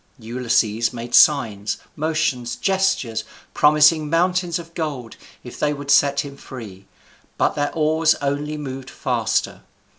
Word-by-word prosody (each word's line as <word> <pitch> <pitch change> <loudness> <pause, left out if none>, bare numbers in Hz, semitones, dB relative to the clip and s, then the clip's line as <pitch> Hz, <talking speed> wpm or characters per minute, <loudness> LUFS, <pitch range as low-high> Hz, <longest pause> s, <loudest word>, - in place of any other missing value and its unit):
Ulysses 115 -2 0
made 120 0 -8
signs, 110 -9 +4 0.2
motions, 155 -6 -1
gestures, 190 - 0 0.3
promising 150 +1 +4
mountains 175 +1 +1
of 170 -1 -10
gold 140 -9 -5 0.3
if 125 - -10
they 150 0 +1
would 140 0 -4
set 140 -1 +4
him 140 -1 -9
free; 100 -9 -10 0.5
but - - +1
their 145 -1 -1
oars 160 0 +2
only 145 +2 -3
moved 135 -2 -7
faster. 115 -5 -1
140 Hz, 125 wpm, -21 LUFS, 120-155 Hz, 0.5 s, signs